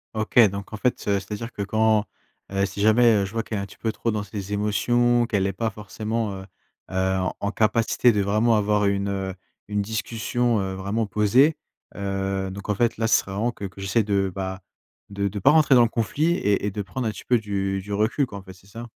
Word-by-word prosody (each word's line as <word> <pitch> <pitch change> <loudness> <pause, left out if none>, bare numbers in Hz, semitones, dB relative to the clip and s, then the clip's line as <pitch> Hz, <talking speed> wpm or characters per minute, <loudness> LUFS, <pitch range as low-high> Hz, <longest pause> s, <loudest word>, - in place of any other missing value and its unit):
OK, 110 +2 -3
donc 100 +1 -7
en - - -4
fait, 125 +3 -1
heu, 100 -1 +2
c'est 100 +2 -13
à - - -1
dire 115 +3 -6
que 100 - -4
quand 110 +1 +2 0.5
heu, 100 0 +1
si 100 +1 -6
jamais, 115 +2 +5
heu, 100 -1 +1
je 95 - -8
vois 115 - 0
qu'elle 110 - -5
est - - -2
un - - -4
petit 100 - -15
peu 110 - -2
trop 115 0 -2
dans 105 -1 -2
ses 100 0 -6
émotions, 120 +4 +2
qu'elle 100 -4 0
est 95 - -2
pas 110 +2 -2
forcément, 110 +1 -4
heu, 95 0 -8 0.5
heu, 95 0 +1 0.2
en 100 - -2
capacité 115 +2 +2
de 105 -2 +1
vraiment 110 +4 +2
avoir 105 0 +2
une, 100 0 0
heu, 95 -1 -3 0.3
une 105 -1 -1
discussion, 115 +2 -1
heu, 95 0 -3
vraiment 100 +3 -2
posée. 125 +10 +3 0.4
Heu, 95 -1 -2
donc, 100 +2 -8
en 105 - +1
fait, 120 +1 +1
là, 110 0 0
ce 110 - +5
serait 95 - -10
vraiment 110 +5 -1
que 100 - -7
que 95 0 -9
j'essaie 95 +4 +1
de, 100 -2 0
bah, 95 -1 -4 0.5
de 100 0 -2
de 100 +1 -4
pas 120 - +5
rentrer 150 -2 +5
dans 120 - +7
le 115 - +3
conflit 140 - 0
et 100 - 0
et - - +1
de 105 - -4
prendre 125 +3 -4
un - - 0 0.2
peu 120 -2 +4
du 100 -2 -2
du 105 +2 -10
recul 110 +7 +1
quoi 100 - -8
en 95 - -10
fait 95 - -11
c'est 95 +1 -21
ça? 115 +4 -8
105 Hz, 245 wpm, -24 LUFS, 100-115 Hz, 0.5 s, dans